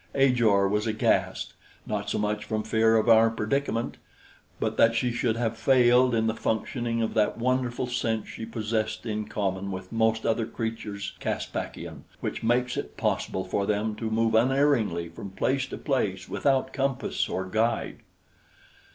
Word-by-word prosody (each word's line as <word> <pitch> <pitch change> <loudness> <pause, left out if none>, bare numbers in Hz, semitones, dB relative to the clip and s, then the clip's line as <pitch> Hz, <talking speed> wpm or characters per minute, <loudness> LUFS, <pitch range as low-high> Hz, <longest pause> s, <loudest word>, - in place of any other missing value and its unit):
Ajor 120 -8 +4
was 105 +3 0
aghast 110 0 0 0.3
not 105 -1 -3
so - - -1
much 105 0 -1
from 110 0 -2
fear 110 0 +3
of 110 - +1
our 115 0 +7
predicament; 115 +1 -1 0.6
but - - -1
that 115 0 +4
she 120 +1 +1
should 115 -1 0
have 115 -1 -1
failed 125 +1 +4
in 110 -1 +2
the 110 - +1
functioning 115 +1 -1
of 110 - -2
that 105 - +1
wonderful 125 0 0
sense 115 -3 -1
she - - -8
possessed 110 0 -2
in 110 -1 -2
common 100 -1 -2
with 95 -1 -6
most 110 0 +1
other 115 0 +1
creatures 105 -4 -4
Caspakian, - - -4
which - - -4
makes 120 +2 +1
it - - -5
possible 95 - -1
for 100 +2 -1
them 105 +1 0
to 110 +1 -4
move 115 0 +1
unerringly 120 -8 +2
from 85 +4 -8
place 135 +7 0
to - - -6
place 105 -10 -1
without 135 -1 +1
compass 135 -1 -1
or 95 - -2
guide. 110 +4 0
110 Hz, 160 wpm, -27 LUFS, 105-120 Hz, 0.6 s, our